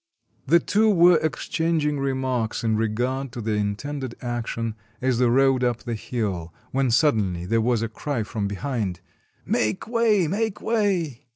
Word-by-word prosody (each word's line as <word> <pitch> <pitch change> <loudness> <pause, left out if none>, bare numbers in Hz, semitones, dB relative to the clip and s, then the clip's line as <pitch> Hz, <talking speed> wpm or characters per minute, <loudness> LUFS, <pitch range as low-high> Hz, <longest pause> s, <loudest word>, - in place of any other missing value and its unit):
] - - -40
The 170 - +7
two 215 +5 +2
were 175 -4 +6
exchanging 155 -1 0
remarks 130 -5 -1
in 110 -1 +2
regard 120 +5 -1
to - - -6
the 110 0 -2
intended 115 +6 -3
action, 115 -2 -3 0.3
as 130 -2 +1
they 125 - +4
rode 130 +1 +3
up 120 -2 0
the 120 - -3
hill, 105 -7 -3 0.2
when 135 -1 +1
suddenly 110 - +2
there 115 +4 +1
was 115 -1 +1
a - - 0
cry 120 +2 -3
from 105 -1 -3
behind, 100 -3 -3 0.4
"Make 110 0 0
way, 225 -6 +3
make 210 +4 -1
way! 180 - -1
125 Hz, 160 wpm, -24 LUFS, 110-150 Hz, 0.4 s, The